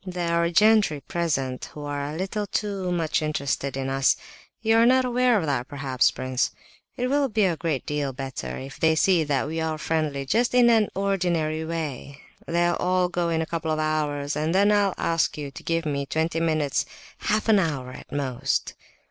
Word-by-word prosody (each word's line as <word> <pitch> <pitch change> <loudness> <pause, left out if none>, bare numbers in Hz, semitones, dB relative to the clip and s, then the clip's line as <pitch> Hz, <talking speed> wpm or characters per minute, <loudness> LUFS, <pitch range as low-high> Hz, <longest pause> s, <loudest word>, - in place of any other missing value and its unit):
There 180 -2 -3
are 170 - +1
gentry 210 -5 +4
present 135 -5 -2
who 150 - -7
are 145 0 -3
a - - -6
little 200 +3 -3
too 195 -3 -2
much 165 -2 0
interested 140 -3 -2
in 135 -1 -2
us. 135 0 +3 0.4
You 225 0 +3
are 230 - +6
not 260 +1 +4
aware 250 -1 +3
of 175 - -1
that 135 -4 -1
perhaps, 135 -3 +1
prince? 130 0 -1 0.5
It 250 - 0
will 280 +1 +1
be 215 -2 +2
a 175 -3 +1
great 160 -5 -2
deal 145 -2 -2
better 135 0 -5
if 135 +1 -9
they 160 0 +3
see 175 0 +3
that 145 -3 0
we 160 +2 -3
are 160 -1 -1
friendly 155 -3 -1
just 235 - +1
in 240 -1 +6
an 220 -2 +3
ordinary 175 -5 0
way. 150 -4 -5 0.3
They'll 175 +1 +2
all 180 0 +1
go 175 -1 -1
in 160 -1 +1
a - - -4
couple 165 -1 -3
of 155 - +1
hours, 150 -2 -1
and 155 +3 0
then 200 +2 +4
I'll 200 -2 +2
ask 165 -2 0
you 145 -2 -5
to - - -10
give 165 0 -1
me 140 -2 -2
twenty 160 +3 -1
minutes—half 155 - -1
an 215 -2 +5
hour 140 -8 -2
at - - -12
most." 135 -2 -1
160 Hz, 195 wpm, -25 LUFS, 145-190 Hz, 0.5 s, are